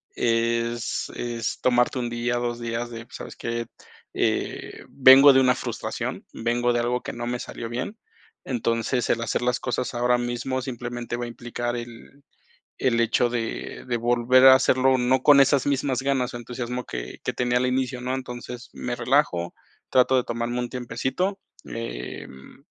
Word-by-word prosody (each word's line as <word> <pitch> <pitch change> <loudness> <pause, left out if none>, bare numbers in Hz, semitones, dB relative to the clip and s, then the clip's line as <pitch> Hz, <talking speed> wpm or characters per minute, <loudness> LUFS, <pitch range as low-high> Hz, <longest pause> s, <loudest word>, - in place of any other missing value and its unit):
es 115 0 0
es 120 -1 -3
tomarte 125 +1 +2
1 120 -1 -2
día, 120 +1 -1
2 120 0 -2
días 115 0 -3
de, 115 -1 -8
pues, 130 - -13
¿sabes - - -9
qué? 115 0 -4 0.5
Eh, - - -2
vengo 135 +1 +8
de 130 - +5
una 125 -1 +4
frustración, - - -4
vengo 120 +1 0
de 120 - +1
algo 120 +1 0
que - - -4
no 120 0 -5
me 125 0 -1
salió 115 - -6
bien. 125 - -4 0.5
Entonces, 115 0 -1
el 115 - +1
hacer - - -1
las 125 0 0
cosas 125 0 -2
ahora 125 0 +2
mismo 120 +2 -2
simplemente 120 -1 -5
va 120 - -3
a - - -6
implicar 120 0 -4
el 120 +4 -9 0.6
el 115 -2 +2
hecho 115 +1 +2
de 115 -2 -4
de 120 - +1
volver 120 +2 +3
a 130 - +11
hacerlo, 130 0 +3
no 130 +1 +2
con 145 0 +7
esas 135 -1 +4
mismas 135 -2 0
ganas 135 -3 0
o - - -3
entusiasmo 125 +1 -5
que 60 0 -6
que - - -1
tenía 125 0 0
al 125 - +1
inicio, 130 0 -1
¿no? 125 +1 -2
Entonces, 125 -1 -7
me 125 -1 -3
relajo, 120 -9 +1 0.4
trato 130 +1 +4
de 125 - +3
tomarme 120 +1 -2
un 120 - -3
tiempecito. 130 - -2 0.2
Eh, 65 - -6
mm, 65 0 -15
120 Hz, 175 wpm, -25 LUFS, 120-130 Hz, 0.6 s, a